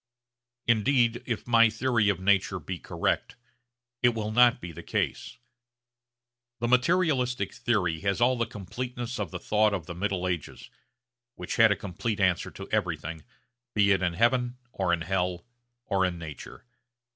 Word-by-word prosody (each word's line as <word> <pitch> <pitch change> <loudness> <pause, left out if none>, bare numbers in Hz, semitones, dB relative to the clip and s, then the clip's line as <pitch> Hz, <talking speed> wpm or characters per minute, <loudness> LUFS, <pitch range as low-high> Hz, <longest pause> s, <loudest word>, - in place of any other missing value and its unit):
Indeed 120 +1 +2
if 115 -3 -3
my 115 -2 +5
theory 110 -1 +1
of 95 -3 0
nature 95 0 +2
be 90 +2 -6
correct, - - -2 0.7
it 120 -2 +3
will 110 -1 -3
not 120 +1 +5
be 90 - -7
the 85 +1 -9
case. - - -3 1.2
The 120 - -1
materialistic 125 -1 +2
theory 105 -10 0
has 100 +3 -1
all 125 +2 +4
the 115 -2 -1
completeness 120 +4 -5
of 100 -5 -2
the - - -5
thought 105 -1 +2
of 90 -6 -5
the 85 - -6
middle 90 0 -2
ages, 85 -4 -5 0.6
which - - -5
had 115 -2 +6
a - - +3
complete 100 +3 -4
answer 90 -3 +1
to - - -9
everything, 80 0 -2 0.5
be 100 -1 +4
it 95 -1 +3
in 90 -2 0
heaven 125 +5 +1
or 95 -5 -1
in 85 -1 +1
hell 90 0 -1 0.4
or 95 -1 +1
in 90 -2 0
nature. 80 - -9
105 Hz, 155 wpm, -27 LUFS, 90-120 Hz, 1.2 s, had